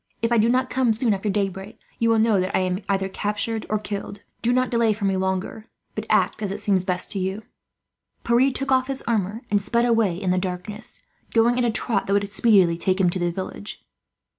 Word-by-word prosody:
If 230 - +1
I 235 - +4
do 225 +2 +3
not 255 +1 +1
come 255 -3 +2
soon 225 0 +1
after 200 +2 -2
daybreak, 195 0 -3 0.2
you 230 - +2
will 225 - +4
know 220 -2 +3
that 185 +1 0
I - - +1
am 185 +1 -1
either 195 -1 +1
captured 210 +3 -3
or 215 - +1
killed. 205 -1 -6 0.2
Do 235 - +1
not 255 0 +1
delay 230 -2 +3
for 205 -1 -4
me 195 -1 +1
longer, 190 +4 -3 0.3
but - - -5
act - - +2
as 200 -1 -3
seems 195 -3 +2
best 180 -1 -1
to 200 - -3
you." 190 +3 -3 0.8
Pierre 240 +3 +3
took 275 +1 -4
off 260 0 +3
his 270 -1 -3
armour 220 0 -1
and 205 -1 +3
sped 235 +4 +1
away 225 -7 +2
in 190 -2 0
the 185 - +2
darkness, 185 +4 -6 0.3
going 235 +2 +4
at 245 - +2
a - - +2
trot 220 -2 0
that 195 - +1
would 200 0 0
speedily 195 -6 +4
take 185 +1 +1
him 180 -2 +3
to 185 - -3
the 175 0 0
village. 190 +3 -7
210 Hz, 225 wpm, -23 LUFS, 190-230 Hz, 0.8 s, I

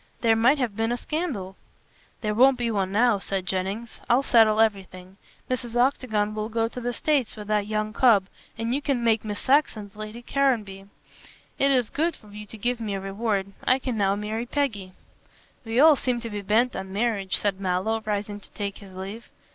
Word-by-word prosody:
There 225 -2 +4
might 245 +6 +4
have 245 -7 -2
been 225 +1 0
a 240 - 0
scandal." 245 - -3 0.7
"There 210 -1 -1
won't 260 +4 +5
be 240 -1 -1
one 195 -3 -1
now," 220 0 +3
said 195 -1 -3
Jennings. 195 +5 -3
"I'll 245 +3 +4
settle 220 -4 +5
everything. 190 -3 -1 0.3
Mrs. 245 -2 -3
Octagon 240 -5 +1
will 215 0 -3
go 225 0 0
to 250 +2 -7
the 245 +1 -1
States 275 -1 0
with 210 -2 -8
that 210 -1 +1
young 215 0 -2
cub, 225 -7 +5 0.3
and 230 +1 -1
you 280 - 0
can 270 -5 -1
make 225 -2 +2
Miss 210 -1 -4
Saxon 255 -7 +1
Lady 215 +3 -8
Caranby. 215 -9 0 0.7
It 275 - +4
is 250 -5 +2
good 325 +1 0
of 210 -1 -15
you 210 0 -8
giving 230 +2 -3
me 200 - -2
a - - -3
reward. 195 0 -2
I 255 - +4
can 255 -2 -3
now 200 -2 +2
marry 215 +3 -3
Peggy." 220 -10 -2 0.7
"We 225 +1 -1
all 310 +1 +8
seem 250 -2 -1
to 230 -1 -6
be 205 -1 -4
bent 225 +5 +2
on 190 0 -5
marriage," 205 -2 0
said 200 -2 -1
Mallow, 190 +4 0
rising 205 -1 -3
to - - -13
take 200 -1 -4
his 195 -2 -13
leave. 195 +5 -7
220 Hz, 195 wpm, -25 LUFS, 200-245 Hz, 0.7 s, all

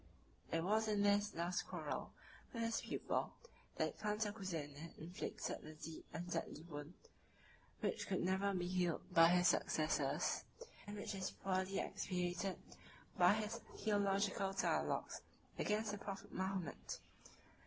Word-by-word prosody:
It 165 0 +2
was 215 +4 +3
in 205 -1 +3
his 205 0 +4
last 175 +2 0
quarrel - - -3 0.4
with 230 -1 -2
his 230 0 +1
pupil - - -1 0.4
that - - 0
Cantacuzene 190 -8 -2
inflicted 170 +4 -4
the 155 - -8
deep 155 +1 -7
and 175 +2 -4
deadly 160 -2 -2
wound, 150 0 -7 0.9
which - - 0
could 190 - +1
never 190 +2 +2
be 180 -2 0
healed 180 0 0
by 165 -1 +9
his 180 0 +6
successors, 150 -3 +2 0.4
and 205 0 -5
which 205 - -3
is 190 -1 -1
poorly 190 0 0
expiated 180 +1 -1 0.6
by 180 +2 +7
his 215 +1 -1 0.2
theological 200 -1 +2
dialogues 195 - +1 0.4
against 210 0 +1
the 205 - -4
prophet 195 -1 -6
Mahomet. 190 -4 -2
190 Hz, 130 wpm, -40 LUFS, 170-205 Hz, 0.9 s, by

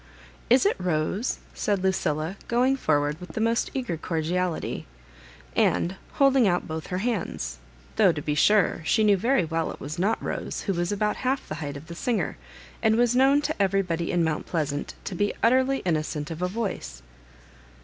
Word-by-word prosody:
"Is 255 +9 +5
it 405 - +3
Rose?" 180 +6 -1 0.2
said 200 -3 -1
Lucilla, 165 -2 0
go 240 +1 +2
ing 270 +1 +3
forward 150 - +1
with 180 -2 -9
the - - -3
most 230 +1 +1
eager 245 -11 -2
cordiality, 165 - -2 0.7
and 180 +3 +2 0.2
holding 270 -4 +4
out 175 -1 +1
both 160 0 -5
her 180 - -2
hands; 180 - -2 0.4
though, 205 -5 +6
to 160 - -4
be 150 0 -1
sure, 195 +6 +3
she 220 +7 +2
knew 205 -1 +5
veiy 225 -2 +2
well 165 0 -1
it - - -8
was 150 +4 -6
not 210 +5 +2
Rose, - - -4
who 195 - 0
was 175 +1 -1
about 210 +1 0
half 260 +1 -1
the - - -4
height 145 -1 -4
of 140 - -11
the 170 - -8
singer, 230 +6 -1 0.5
and 220 -1 +4
was 240 +1 +3
known 275 +3 +4
to 305 -8 -1
everybody 185 -4 +1
m 175 - +2
Mount 160 -2 -1
Plsassiit 150 -4 -2
to - - -5
be 205 +3 0
utterly 260 +3 +3
innocent 155 -2 -1
of 165 +1 -6
a 180 - +1
vY>ioe. 185 - -4
185 Hz, 185 wpm, -26 LUFS, 160-230 Hz, 0.7 s, though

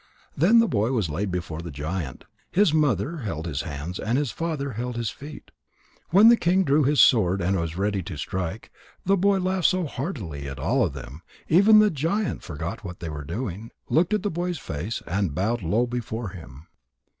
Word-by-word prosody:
Then 190 +11 +5
the 230 0 +5
boy 115 - 0
was 105 -11 0
laid 95 +6 -2
before 85 -3 -4
the 85 - -7
giant. 75 -1 -5 0.2
His 190 -4 +3
mother 150 - +1
held 85 - -4
his 75 -4 -2
hands, 75 +6 -6
and 115 +4 0
his 145 -4 0
father 155 -4 -3
held 120 +2 -4
his 115 -4 -2
feet. 145 +2 -11 0.6
When 200 +6 +7
the 235 - +8
king 185 +1 +2
drew 150 -1 +3
his 145 +1 +2
sword 95 -6 +5
and 95 +2 +1
was 85 -1 -3
ready 100 0 0
to 75 - -7
strike, 95 - -4 0.3
the 195 +2 +4
boy 200 +1 +3
laughed 185 -2 +1
so 185 -1 +1
heartily 115 - -5
that 65 -1 -6
all 65 - +1
of - - -1
them, 70 +7 -9 0.3
even 200 +6 +7
the 215 -1 +6
giant, 165 +8 -1
forgot 85 +6 -6
what 90 -3 -8
they 85 - -5
were 75 -1 -6
doing, 105 - -5 0.2
looked 170 +6 +3
at 210 - -2
the 205 - -1
boy's 175 +1 -2
face, 90 - -5
and 90 -3 -1
bowed 110 +7 0
low 105 +8 +1
before 120 -2 -4
him. 80 -6 -12
110 Hz, 200 wpm, -25 LUFS, -, 0.6 s, the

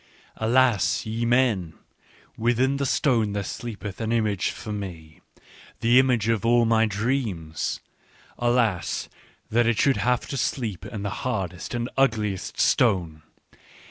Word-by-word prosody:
" - - -30
Alas, 115 -8 +3
ye 115 +2 -2
men, 115 -10 +1 0.6
within 120 +4 +1
the 140 -1 -1
stone 115 -7 +1
there 100 -1 -2
sleepeth 100 -1 -6
an 110 0 -1
image 105 -4 +1
for 110 - -7
me, 85 -5 -8 0.6
the 120 +2 +5
image 125 -5 +2
of 115 -3 +1
all 120 0 +4
my 115 0 +3
dreams! 105 - -2 0.6
Alas, 120 -7 +1 0.4
that 120 +1 +3
it 120 -2 +2
should 135 +1 +3
have 120 +4 +1
to 140 - -4
sleep 115 - -2
in 105 -3 -6
the 100 - -2
hardest 95 -5 -3
and 120 0 -2
ugliest 110 -7 0
stone 85 -5 +2
110 Hz, 140 wpm, -25 LUFS, 100-120 Hz, 0.6 s, the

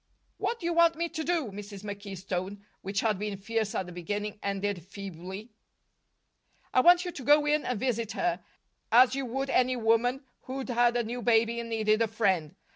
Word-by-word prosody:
"What 465 - -1
do 340 - -7
you 340 - +1
want 335 0 +5
me 335 +1 -2
to 315 - -4
do?" 315 -9 0
Mrs. 200 0 -9
McKee's 200 -2 -7
tone, 195 +2 -4 0.2
which 195 +1 -2
had 215 -4 +1
been 205 -1 -3
fierce 220 +1 -2
at 190 - -1
the 180 - -9
beginning, 205 +4 -4
ended 200 -2 -2
feebly. 195 +3 -8 1.2
"I 255 - +5
want 350 +4 +6
you 355 - -3
to 275 - -8
go 295 +3 +5
in 295 0 +2
and 250 -4 -2
visit 230 -3 -1
her, 350 0 -1 0.5
as 250 +2 +7
you 270 -1 -2
would 270 +3 -2
any 255 0 +3
woman 240 +3 +2 0.2
who'd 265 0 -5
had 240 0 +3
a 240 - +1
new 240 +2 -4
baby 230 0 +3
and 230 0 -5
needed 215 -1 +2
a 230 - +3
friend. 190 -8 0
225 Hz, 200 wpm, -29 LUFS, 200-260 Hz, 1.2 s, as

